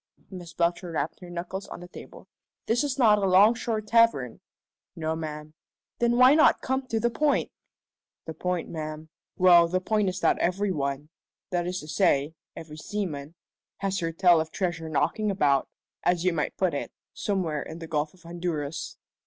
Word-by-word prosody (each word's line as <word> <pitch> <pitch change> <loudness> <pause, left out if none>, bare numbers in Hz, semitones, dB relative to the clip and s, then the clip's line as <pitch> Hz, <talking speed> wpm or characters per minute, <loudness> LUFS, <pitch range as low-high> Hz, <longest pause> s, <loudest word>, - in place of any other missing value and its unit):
Miss 175 -3 -9
Belcher 175 +1 0
rapped 155 0 -2
her 180 - -11
knuckles 180 +3 -5
on - - -8
the 175 - -10
table. - - -12 0.4
"This 240 +5 +1
is 280 -2 -2
not 215 -5 +5
a 195 - +1
'longshore 215 +4 +4
tavern." 215 - +2 0.6
"No, 160 -1 -2
ma'am." 155 -1 -6 0.5
"Then 240 0 +2
why 255 +2 +7
not 310 +1 +5
come 265 0 -2
to 225 -2 -1
the 235 +1 +1
point?" 295 +5 +1 0.7
"The 160 - -6
point, 180 0 -2
ma'am 155 -1 -6 0.3
well, 175 -2 +7
the 185 +2 0
point 210 +1 +1
is 185 - -4
that - - +2
every 195 +3 0
one 140 -2 -3 0.4
that 175 -1 -1
is 180 +1 -2
to 150 - -11
say, 145 0 +2 0.2
every 155 -2 -9
seaman 155 -4 -5 0.4
has 195 0 -2
heard 165 -1 -3
tell 175 -4 +5
of 160 - -5
treasure 165 -3 -3
knocking 160 +8 0
about, 145 -9 +2 0.3
as 175 0 +1
you 180 - +3
might 155 -3 -2
put 185 -4 +1
it, 140 - -4 0.2
somewhere 180 -7 -2
in 160 - -8
the 165 - -7
Gulf 150 0 -2
of 185 - -23
Honduras." 165 -3 -4
175 Hz, 175 wpm, -26 LUFS, 155-200 Hz, 0.7 s, why